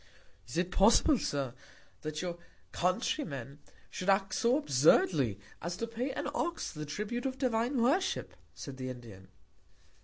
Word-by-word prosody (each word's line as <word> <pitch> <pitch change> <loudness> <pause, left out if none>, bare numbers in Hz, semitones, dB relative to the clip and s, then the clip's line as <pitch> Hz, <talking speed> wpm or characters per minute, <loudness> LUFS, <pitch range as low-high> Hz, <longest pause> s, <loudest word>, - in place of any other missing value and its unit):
Is 120 - -5
it 180 +1 0
possible, 230 +8 +5
Sir, 135 -4 -2 0.5
that 155 +2 -4
your 175 -1 -4 0.3
Country 185 - 0
men 140 -1 -7 0.3
should 185 - -3
act 195 0 +3
so 245 +3 +3
absurdly, 140 - +3 0.2
as 170 +2 -3
to 230 - -2
pay 230 +3 -3
an - - -3
Ox 340 +2 -2
the 150 -2 -6
Tribute 215 - -2
of 260 0 -4
divine 250 0 +1
Worship, 285 +11 +1 0.2
said 140 -2 -7
the 130 -1 -4
Indian? 115 -7 -10
185 Hz, 150 wpm, -32 LUFS, -, 0.5 s, possible